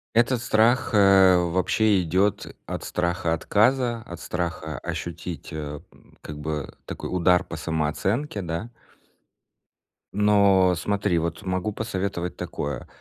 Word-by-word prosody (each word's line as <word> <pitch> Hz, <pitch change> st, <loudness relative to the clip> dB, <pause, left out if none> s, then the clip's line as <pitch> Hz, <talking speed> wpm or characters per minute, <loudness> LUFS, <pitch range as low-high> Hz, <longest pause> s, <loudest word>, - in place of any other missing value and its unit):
Этот 120 Hz, +1 st, +3 dB
страх, 120 Hz, +4 st, +3 dB
э, 95 Hz, -2 st, +6 dB
вообще 95 Hz, +4 st, +2 dB
идет 95 Hz, +4 st, +1 dB, 0.2 s
от -, -, -5 dB
страха 85 Hz, -1 st, -1 dB
отказа, 120 Hz, +6 st, +1 dB
от 85 Hz, 0 st, -9 dB
страха 80 Hz, -4 st, -4 dB
ощутить, 85 Hz, 0 st, -6 dB
э, 75 Hz, -1 st, -5 dB
м, -, -, -23 dB
как 75 Hz, -1 st, -8 dB
бы 75 Hz, -1 st, -4 dB
такой -, -, -6 dB
удар 90 Hz, 0 st, +3 dB
по 85 Hz, -, -7 dB
самооценке, 85 Hz, -, -1 dB
да. 90 Hz, +7 st, -4 dB, 1.4 s
Но 100 Hz, -3 st, +4 dB
смотри, 100 Hz, 0 st, 0 dB
вот 85 Hz, 0 st, -3 dB
могу 95 Hz, +3 st, -2 dB
посоветовать 95 Hz, -5 st, -3 dB
такое: 70 Hz, -3 st, -5 dB
90 Hz, 120 wpm, -24 LUFS, 85-105 Hz, 1.4 s, э